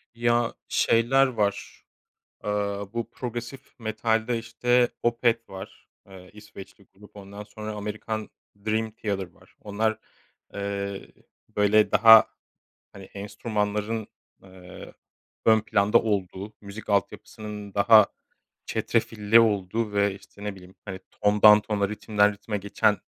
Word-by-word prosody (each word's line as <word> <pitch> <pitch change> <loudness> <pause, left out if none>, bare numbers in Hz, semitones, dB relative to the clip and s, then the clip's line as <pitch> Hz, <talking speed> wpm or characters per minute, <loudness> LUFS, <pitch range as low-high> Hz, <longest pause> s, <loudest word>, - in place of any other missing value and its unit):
Ya, 120 0 +1
şeyler 130 +4 +3
var; 105 -5 -3 0.6
Aaa, 100 0 -3
bu 115 -1 -4
progresif 120 +2 -8
metalde 110 +1 -1
işte 120 +1 +1
Opeth 115 -1 +1
var, 95 +2 -11 0.2
ııı, 95 -1 -14
İsveçli 105 -1 -13
grup 105 +2 -18
ondan 100 +1 -9
sonra, 110 0 -8
Amerikan, 105 +1 -5 0.4
Dream 110 +1 0
Theater 100 -4 -4
var. - - -24
Onlar, 110 +1 -1 0.6
ııı, 100 -1 -4 0.5
böyle 105 +1 +3
daha, 110 0 +8 0.6
hani, 100 -1 -11
enstrümanların, 105 +2 -3 0.4
ııı, 95 -1 -13 0.5
ön 110 -1 +5
planda 105 +1 +3
olduğu, 100 -1 -3
müzik 100 +2 -10
altyapısının 105 0 -3
daha 105 0 +6 0.6
çetrefilli 110 +1 +2
olduğu 105 0 0
ve 100 -1 +1
işte, 100 +1 -14
ne 105 -1 -4
bileyim, 90 0 -15
hani, 95 -2 -7
tondan 105 +1 +5
tona, 105 -2 -1
ritimden 105 0 +1
ritime 105 +1 -5
geçen 100 0 +1
105 Hz, 115 wpm, -25 LUFS, 100-110 Hz, 0.6 s, daha